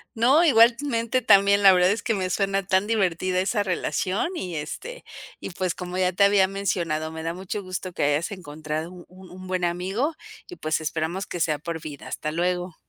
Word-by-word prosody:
No, 260 +9 +4
igualmente 235 -2 +3
también, 200 -1 +5
la 195 -1 +9
verdad 180 0 +4
es 210 +3 -1
que 230 - 0
me 185 -3 -2
suena 195 +1 0
tan 190 +1 +2
divertida 185 -4 0
esa 205 +2 0
relación, 190 - -1
y 180 - -5
este, 475 - -6 0.4
y - - -6
pues 180 -1 -2
como 180 0 -6
ya 185 -1 +2
te 200 +3 +3
había 200 -1 +5
mencionado, 170 -5 -2
me 160 0 -7
da 165 +1 -2
mucho 190 +3 -5
gusto 185 -1 -5
que - - -2
hayas 145 +3 +1
encontrado 155 -2 -5
un 185 +1 -14
un 185 0 -10
buen 185 -1 -2
amigo 190 - -1 0.3
y 360 - -9
pues 155 +1 -1
esperamos 160 +5 -2
que 175 - -6
sea 155 -2 +1
por 165 +1 -6
vida. 150 -3 -9
Hasta 155 - -4
luego. 180 +1 -1
185 Hz, 195 wpm, -24 LUFS, 170-200 Hz, 0.4 s, la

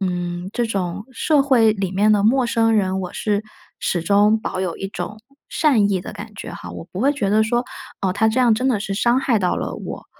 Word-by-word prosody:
嗯， 175 -1 -3
这 240 - +1
种 195 -2 -3
社 290 +3 +2
会 235 -6 +4
里 195 -2 -3
面 205 +3 +3
的 205 -1 +3
陌 250 +3 +3
生 225 -1 +2
人， 190 -2 +1
我 180 -1 -5
是 210 0 -1 0.3
始 175 - -1
终 205 +4 +3
保 185 - -4
有 180 -3 -2
一 195 - -4
种 210 +2 -6 0.3
善 235 -11 +3
意 190 -2 0
的 - - -8
感 - - -9
觉 - - -7
哈， 90 - -8
我 85 -1 -7
不 185 - -7
会 275 +5 +3
觉 235 -9 -1
得 215 +2 +3
说， 240 +2 +1 0.4
哦， 190 -2 0
他 220 +2 +2
这 220 +4 +2
样 240 -3 +5
真 250 +4 -1
的 215 -6 +1
是 195 -2 -3
伤 240 +5 +2
害 250 -4 +2
到 180 - +1
了 - - -4
我， - - -7
210 Hz, 255 characters per minute, -21 LUFS, 190-235 Hz, 0.4 s, 样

